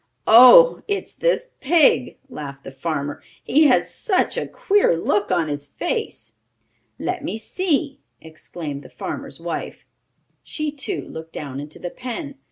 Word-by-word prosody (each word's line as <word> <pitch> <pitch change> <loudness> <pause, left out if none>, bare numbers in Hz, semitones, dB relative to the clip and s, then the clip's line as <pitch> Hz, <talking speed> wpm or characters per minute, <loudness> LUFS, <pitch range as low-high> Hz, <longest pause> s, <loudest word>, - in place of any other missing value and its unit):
"Oh, 255 - +8
it's 405 -1 -3
this - - 0
pig," 285 - +3
laughed 140 -2 -8
the - - -9
farmer. 145 +1 -4 0.2
"He 305 +5 +4
has 255 -4 +3
such 380 -4 0
a - - -2
queer 410 - +2
look 205 +4 0
on 175 -3 +1
his 145 -1 -4
face!" 445 - -4 0.6
"Let 365 -4 -3
me 290 - -3
see!" 290 - -1 0.2
exclaimed 155 -2 -8
the - - -14
farmer's - - -7
wife. - - -6 0.6
She, 305 -1 -4
too, 305 +6 -4
looked 160 0 -9
down 140 -2 -6
into 145 +2 -9
the 175 - -6
pen. 270 +4 -6
245 Hz, 145 wpm, -21 LUFS, -, 0.6 s, Oh